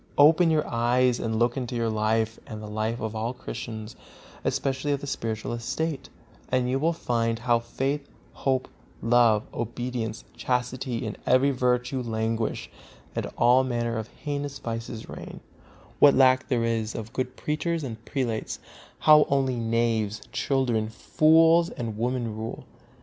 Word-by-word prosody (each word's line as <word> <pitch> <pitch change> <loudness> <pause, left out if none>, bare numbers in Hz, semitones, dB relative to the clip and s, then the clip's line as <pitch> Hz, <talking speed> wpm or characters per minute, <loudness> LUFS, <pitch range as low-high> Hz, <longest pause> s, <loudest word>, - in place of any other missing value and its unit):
Open 160 +4 +6
your 155 -2 +2
eyes 120 +1 +2
and 110 -1 -1
look 120 +1 +2
into 125 -2 -3
your 115 -1 0
life 110 +1 0
and 110 -2 -7
the 105 - -7
life 110 +2 -2
of 110 0 -4
all 115 +3 -2
Christians, 110 -2 -7 0.5
especially 135 +2 -1
of 140 - -1
the - - -5
spiritual 115 -5 -3
estate, 140 +6 -3 0.4
and 130 -1 +1
you 130 +2 0
will 160 +4 +2
find 115 -7 -1
how 120 0 +2
faith, 135 +4 -3 0.2
hope, 130 -1 0 0.4
love, 115 -2 +4
obedience, 120 -1 -3
chastity 125 -1 -2
and 110 - -5
every 130 +3 +4
virtue 125 0 0
languish, 115 -1 -2 0.5
and - - -2
all 125 +2 +5
manner 120 -2 -1
of 110 -1 -3
heinous 145 0 -5
vices 115 -1 -5
reign; - - -8 0.6
what 145 - +7
a - - +1
lack 130 -1 +5
there 125 -4 +1
is 115 -1 -1
of 115 +1 -6
good 130 -1 -2
preachers 160 +2 -1
and 115 -4 -6
prelates; 115 -4 -2 0.4
how 150 -1 +7
only 135 -2 +1
knaves, 115 -3 0
children, 120 -6 0
fools 165 +7 +4
and 115 -3 -5
women 120 -1 -1
rule. 110 +1 -6
120 Hz, 150 wpm, -26 LUFS, 115-135 Hz, 0.6 s, what